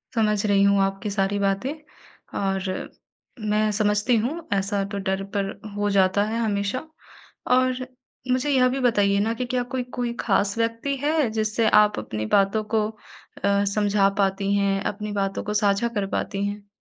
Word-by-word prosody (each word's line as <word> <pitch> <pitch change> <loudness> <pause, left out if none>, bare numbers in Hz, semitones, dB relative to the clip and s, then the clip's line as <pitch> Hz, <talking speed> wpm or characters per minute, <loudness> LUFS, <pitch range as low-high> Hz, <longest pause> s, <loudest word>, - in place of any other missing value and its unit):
समझ 210 -2 +2
रही 200 -1 +4
हूँ 200 0 +4
आपकी 195 +2 -1
सारी 200 0 0
बातें 200 +8 0 0.7
और 195 -1 -2 0.6
मैं 215 0 +2
समझती 210 +3 +2
हूँ 310 +9 -3
ऐसा 195 +1 0
तो 200 - -3
डर 190 0 0
पर 195 -1 0 0.2
हो 205 0 0
जाता 195 +1 +3
है 225 +2 -2
हमेशा 205 +1 -1 0.7
और 255 0 +1 0.5
मुझे 255 +3 +1
यह 255 -2 +4
भी 270 +2 -2
बताइए 200 -4 +3
ना 220 +3 +1
कि 250 +2 -3
क्या 250 0 -1
कोई 255 - 0
कोई 240 -1 -1
ख़ास 200 0 +1
व्यक्ति 230 +4 -1
है, 295 -2 +1
जिससे 220 0 0
आप 210 - +4
अपनी 110 0 -4
बातों 200 +2 +2
को 215 -1 +3
अ, 200 -2 -3
समझा 205 -1 +3
पाती 195 0 +1
हैं? 195 -1 +1
अपनी 210 0 -3
बातों 195 -1 -2
को 210 - -3
साझा 205 +2 +2
कर 195 - 0
पाती 200 0 -2
हैं? 205 0 -6
205 Hz, 170 wpm, -24 LUFS, 200-230 Hz, 0.7 s, रही